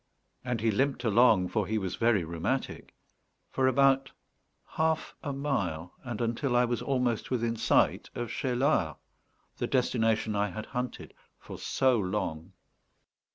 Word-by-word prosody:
And 125 Hz, -3 st, -2 dB
he 115 Hz, 0 st, +2 dB
limped 130 Hz, +3 st, 0 dB
along, 110 Hz, -5 st, +4 dB
for 105 Hz, -4 st, -1 dB
he 110 Hz, -, 0 dB
was 95 Hz, -3 st, -2 dB
very 115 Hz, -5 st, +2 dB
rheumatic, 85 Hz, +11 st, -3 dB, 0.6 s
for 130 Hz, -1 st, +2 dB
about 135 Hz, +1 st, +3 dB, 0.6 s
half 160 Hz, 0 st, 0 dB
a 145 Hz, -, -3 dB
mile, 100 Hz, -, -2 dB
and 120 Hz, -4 st, -5 dB
until 120 Hz, +3 st, 0 dB
I 120 Hz, 0 st, +5 dB
was 120 Hz, -2 st, -2 dB
almost 125 Hz, -4 st, 0 dB
within 115 Hz, -2 st, 0 dB
sight -, -, +2 dB
of 120 Hz, -1 st, -4 dB
Cheylard, 125 Hz, -, +1 dB, 0.6 s
the -, -, -2 dB
destination 115 Hz, -4 st, +1 dB
I 100 Hz, 0 st, +1 dB
had 110 Hz, 0 st, -6 dB
hunted 125 Hz, 0 st, -5 dB, 0.2 s
for -, -, -10 dB
so 130 Hz, -3 st, +2 dB
long. 90 Hz, -3 st, -3 dB
120 Hz, 140 wpm, -29 LUFS, 105-130 Hz, 0.6 s, I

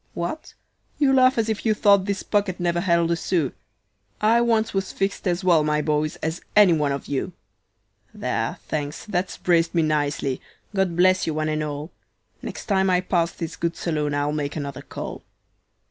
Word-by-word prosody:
What? 175 Hz, -, -5 dB, 0.4 s
You 275 Hz, -2 st, +3 dB
laugh 260 Hz, -1 st, +5 dB
as 225 Hz, -1 st, +1 dB
if 220 Hz, -2 st, -2 dB
you 220 Hz, -2 st, +2 dB
thought 200 Hz, -2 st, +4 dB
this 200 Hz, -1 st, -2 dB
pocket 200 Hz, -3 st, 0 dB
never 175 Hz, -1 st, +1 dB
held 170 Hz, -2 st, +2 dB
a -, -, +3 dB
sou; 165 Hz, -4 st, 0 dB, 0.7 s
I 225 Hz, +3 st, +4 dB
once 225 Hz, -2 st, +1 dB
was 195 Hz, -1 st, -1 dB
fixed 195 Hz, 0 st, -2 dB
as 175 Hz, +1 st, 0 dB
well, 170 Hz, -4 st, +4 dB
my 150 Hz, 0 st, +1 dB
boys, 150 Hz, 0 st, 0 dB
as 160 Hz, +2 st, -2 dB
any 205 Hz, -4 st, +7 dB
one 150 Hz, -3 st, +1 dB
of 140 Hz, -, -3 dB
you. 140 Hz, -2 st, -3 dB, 0.8 s
"There, -, -, -2 dB
thanks, 150 Hz, -1 st, -4 dB
that's 185 Hz, -3 st, -2 dB
braced 170 Hz, -1 st, +2 dB
me 165 Hz, -, +3 dB
nicely; 145 Hz, -3 st, 0 dB, 0.3 s
God 190 Hz, -3 st, 0 dB
bless 185 Hz, +1 st, +3 dB
you 160 Hz, -, -1 dB
one 155 Hz, 0 st, -1 dB
and 155 Hz, 0 st, -1 dB
all; 150 Hz, +1 st, -4 dB, 0.5 s
Next -, -, -7 dB
time 190 Hz, -2 st, +2 dB
I 180 Hz, -1 st, +3 dB
pass 170 Hz, -2 st, +1 dB
this 165 Hz, -2 st, -5 dB
good 170 Hz, +2 st, -2 dB
saloon 150 Hz, -3 st, -1 dB
I'll 145 Hz, 0 st, 0 dB
make 145 Hz, -1 st, -3 dB
another 140 Hz, -3 st, -5 dB
call. -, -, -7 dB
170 Hz, 185 wpm, -23 LUFS, 150-195 Hz, 0.8 s, any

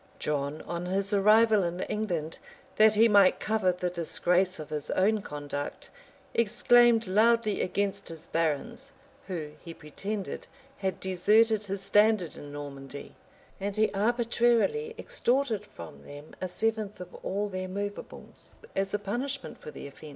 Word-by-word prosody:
John, 145 Hz, 0 st, -2 dB
on 175 Hz, +1 st, -4 dB
his 195 Hz, +2 st, -1 dB
arrival 215 Hz, +1 st, +5 dB
in 175 Hz, +1 st, -3 dB
England, 175 Hz, -7 st, -3 dB, 0.4 s
that 215 Hz, 0 st, +6 dB
he 225 Hz, +2 st, +6 dB
might 200 Hz, -3 st, +5 dB
cover 215 Hz, -4 st, +1 dB
the 180 Hz, 0 st, -3 dB
disgrace 180 Hz, +2 st, +1 dB
of 155 Hz, -, -9 dB
his 150 Hz, -2 st, -4 dB
own 210 Hz, +3 st, +2 dB
conduct, 145 Hz, -3 st, -6 dB, 0.4 s
exclaimed 235 Hz, +1 st, +4 dB
loudly 215 Hz, +2 st, +3 dB
against 200 Hz, +2 st, -2 dB
his 165 Hz, -2 st, -9 dB
barons, 230 Hz, -, -2 dB, 0.3 s
who, 165 Hz, -6 st, -5 dB
he 165 Hz, -1 st, -8 dB
pretended, 195 Hz, +6 st, -5 dB, 0.3 s
had 190 Hz, -3 st, -2 dB
deserted 210 Hz, +4 st, +3 dB
his 195 Hz, 0 st, -4 dB
standard 205 Hz, -3 st, +3 dB
in 145 Hz, -, -10 dB
Normandy; 140 Hz, -1 st, -8 dB, 0.5 s
and 200 Hz, 0 st, -3 dB
he 215 Hz, 0 st, +2 dB
arbitrarily 240 Hz, -, +1 dB
extorted 265 Hz, -, +1 dB
from 80 Hz, -4 st, -11 dB
them 145 Hz, +2 st, -11 dB
a 185 Hz, -, -1 dB
seventh 215 Hz, +2 st, -1 dB
of 180 Hz, 0 st, -9 dB
all 205 Hz, +2 st, -1 dB
their 185 Hz, -1 st, -4 dB
movables, 205 Hz, +2 st, -7 dB, 0.2 s
as 195 Hz, +1 st, 0 dB
a -, -, +2 dB
punishment 250 Hz, +7 st, -4 dB
for -, -, -9 dB
the -, -, -9 dB
offence. 140 Hz, +2 st, -11 dB
195 Hz, 145 wpm, -28 LUFS, 170-220 Hz, 0.5 s, that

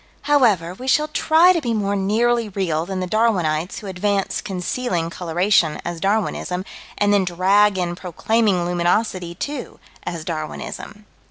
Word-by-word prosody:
However, 220 Hz, -, +3 dB
we 255 Hz, +8 st, -9 dB
shall 300 Hz, +3 st, +2 dB
try 330 Hz, +3 st, +4 dB
to 335 Hz, -, -1 dB
be 235 Hz, -4 st, -1 dB
more 200 Hz, -1 st, 0 dB
nearly 225 Hz, +3 st, +1 dB
real 175 Hz, -5 st, -2 dB
than 190 Hz, -1 st, -3 dB
the -, -, -1 dB
Darwinites 180 Hz, -6 st, 0 dB
who -, -, -10 dB
advance 195 Hz, +1 st, -1 dB
concealing 180 Hz, -2 st, -2 dB
coloration 175 Hz, -1 st, +1 dB
as 175 Hz, -1 st, -4 dB
Darwinism, 195 Hz, -1 st, -1 dB, 0.3 s
and 205 Hz, 0 st, +2 dB
then 200 Hz, -1 st, +3 dB
drag 190 Hz, +3 st, +3 dB
in 175 Hz, -1 st, -1 dB
proclaiming 185 Hz, +1 st, 0 dB
luminosity, 175 Hz, 0 st, 0 dB
too, 285 Hz, +7 st, -6 dB, 0.2 s
as 165 Hz, -2 st, -5 dB
Darwinism. 170 Hz, +6 st, -6 dB
195 Hz, 145 wpm, -21 LUFS, 175-220 Hz, 0.3 s, try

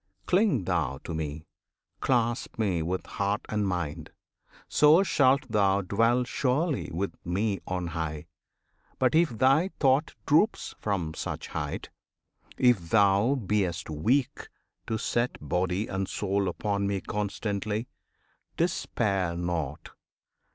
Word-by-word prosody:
Cling 185 Hz, -, +3 dB
thou 70 Hz, -5 st, -1 dB
to -, -, -5 dB
Me! 80 Hz, 0 st, -4 dB, 0.5 s
Clasp 120 Hz, -2 st, 0 dB
Me 95 Hz, -7 st, 0 dB
with 90 Hz, +3 st, -2 dB
heart 100 Hz, +3 st, -1 dB
and 105 Hz, -2 st, 0 dB
mind! 85 Hz, -4 st, -3 dB, 0.6 s
so 155 Hz, +5 st, +6 dB
shalt 140 Hz, -6 st, +3 dB
thou 100 Hz, -3 st, +2 dB
dwell 115 Hz, +6 st, +2 dB
Surely 140 Hz, +5 st, 0 dB
with 95 Hz, +4 st, -2 dB
Me 95 Hz, +2 st, -1 dB
on 90 Hz, -1 st, -2 dB
high. 80 Hz, -2 st, -4 dB, 0.7 s
But 130 Hz, -1 st, +2 dB
if 165 Hz, +1 st, +4 dB
thy 135 Hz, -, +4 dB
thought 140 Hz, +2 st, +2 dB
Droops 165 Hz, +9 st, +2 dB
from 90 Hz, -7 st, -2 dB
such -, -, -5 dB
height; -, -, -4 dB, 0.7 s
if 110 Hz, -10 st, +3 dB
thou 100 Hz, +5 st, +4 dB
be'st 95 Hz, -, -1 dB
weak 120 Hz, -, 0 dB, 0.4 s
to 110 Hz, -, -1 dB
set 120 Hz, +2 st, -1 dB
Body 90 Hz, +7 st, -1 dB
and 95 Hz, -2 st, -3 dB
soul 100 Hz, -1 st, 0 dB
upon 100 Hz, +2 st, -1 dB
Me 100 Hz, -1 st, 0 dB
constantly, 105 Hz, +3 st, -3 dB, 0.7 s
Despair 100 Hz, -, 0 dB
not! 85 Hz, -4 st, -3 dB
100 Hz, 120 wpm, -28 LUFS, 90-125 Hz, 0.7 s, so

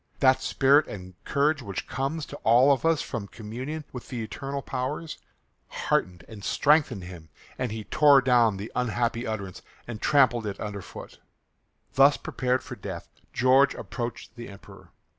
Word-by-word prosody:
That 130 Hz, -1 st, +4 dB
spirit 140 Hz, +4 st, +3 dB
and 95 Hz, -2 st, -9 dB
courage 145 Hz, +1 st, +1 dB
which 100 Hz, -5 st, -5 dB
comes 140 Hz, +3 st, -3 dB
to -, -, -9 dB
all 125 Hz, +5 st, +5 dB
of 140 Hz, +3 st, +1 dB
us 165 Hz, -2 st, +2 dB
from 115 Hz, -5 st, -5 dB
communion 125 Hz, +9 st, -7 dB
with 125 Hz, -, -8 dB
the 120 Hz, -4 st, -4 dB
eternal 135 Hz, +5 st, -5 dB
powers 150 Hz, +5 st, -4 dB, 0.5 s
heartened 90 Hz, -1 st, -2 dB
and 105 Hz, -3 st, -11 dB
strengthened 145 Hz, -, +2 dB
him, 90 Hz, -3 st, -11 dB, 0.3 s
and 125 Hz, -3 st, -2 dB
he 110 Hz, 0 st, -5 dB
tore 145 Hz, +2 st, +5 dB
down 120 Hz, -5 st, +3 dB
the 105 Hz, +4 st, -7 dB
unhappy 120 Hz, 0 st, -1 dB
utterance 100 Hz, -4 st, -5 dB, 0.3 s
and 115 Hz, -3 st, -7 dB
trampled 125 Hz, -6 st, +3 dB
it 100 Hz, -, -5 dB
under 105 Hz, -2 st, -5 dB
foot. -, -, -11 dB, 0.7 s
Thus 140 Hz, +2 st, +5 dB
prepared 125 Hz, 0 st, -1 dB
for -, -, -8 dB
death -, -, -8 dB, 0.2 s
George 130 Hz, +3 st, +4 dB
approached 120 Hz, -2 st, -6 dB
the 120 Hz, -1 st, -8 dB
Emperor. 100 Hz, 0 st, -14 dB
125 Hz, 160 wpm, -26 LUFS, 110-140 Hz, 0.7 s, all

